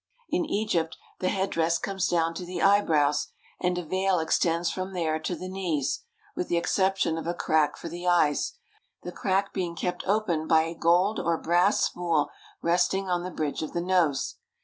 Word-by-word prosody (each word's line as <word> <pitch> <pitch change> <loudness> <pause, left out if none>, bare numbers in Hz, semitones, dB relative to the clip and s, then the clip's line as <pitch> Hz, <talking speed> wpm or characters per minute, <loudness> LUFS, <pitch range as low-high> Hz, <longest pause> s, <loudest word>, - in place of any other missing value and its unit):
In 345 0 +1
Egypt 205 - -1 0.2
the 185 - 0
headdress 170 -4 +1
comes 195 -1 -2
down 165 -1 +1
to 175 - -6
the 180 +1 -5
eyebrows, 155 -8 +3 0.3
and 180 0 0
a 180 - -3
veil 190 +2 +1
extends 165 +1 +1
from 185 +1 -4
there 160 -3 0
to 175 +3 -3
the 185 - -7
knees, 185 - -2 0.3
with 180 - -2
the 170 - +1
exception 190 -2 +1
of 165 - -6
a 170 - -1
crack 155 -3 +1
for - - -7
the 175 +2 -6
eyes, 160 -5 +2 0.5
the 180 - -5
crack 195 +2 0
being 175 -3 -2
kept 180 +2 -3
open 185 -6 +1
by 160 -1 +5
a 165 +1 -4
gold 175 +6 +2
or 170 -1 +1
brass 175 +5 +2
spool 170 -4 0 0.3
resting 180 +3 +1
on 175 -1 +1
the 180 - -4
bridge 155 -4 -3
of 155 - -5
the 175 - 0
nose. 175 -6 +1
175 Hz, 185 wpm, -27 LUFS, 165-190 Hz, 0.5 s, by